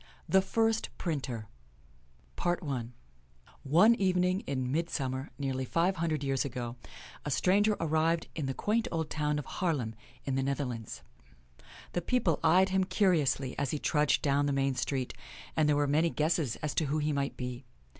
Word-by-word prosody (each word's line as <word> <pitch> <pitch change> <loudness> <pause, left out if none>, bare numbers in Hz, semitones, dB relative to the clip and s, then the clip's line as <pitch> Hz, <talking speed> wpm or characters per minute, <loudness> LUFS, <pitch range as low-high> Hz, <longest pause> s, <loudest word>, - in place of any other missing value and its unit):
THE 190 - +5
FIRST 225 +3 +1
PRINTER 135 - -3 2.2
One 175 +12 +5
evening 185 -3 +2
in 130 -2 -1
midsummer, 135 -4 -2
nearly 135 -2 -2
five 170 +8 +1
hundred 160 -3 -1
years 135 -1 +1
ago, 120 -3 -4 0.5
a - - -3
stranger 205 +8 +3
arrived 160 +1 +1
in 150 -4 -3
the 135 - -2
quaint 220 +2 0
old 160 -2 -2
town 150 -1 0
of 150 - -4
Haarlem, 140 -11 -1 0.3
in 135 - -1
the 135 - +1
Netherlands. 130 -5 -3 0.9
The 175 - 0
people 190 - +1
eyed 185 +4 +5
him 190 0 +2
curiously 165 -9 +1
as 140 -2 0
he 150 - -1
trudged 150 0 +2
down 145 0 +2
the 140 - +1
main 135 0 +1
street, 130 0 -2 0.4
and 155 -1 +3
there 150 - +4
were 145 0 +2
many 155 +4 +2
guesses 155 -6 0
as 150 - -1
to 160 - +1
who 145 +2 0
he 150 0 0
might 140 -1 -2
be. 125 0 -5
150 Hz, 160 wpm, -31 LUFS, 135-175 Hz, 2.2 s, THE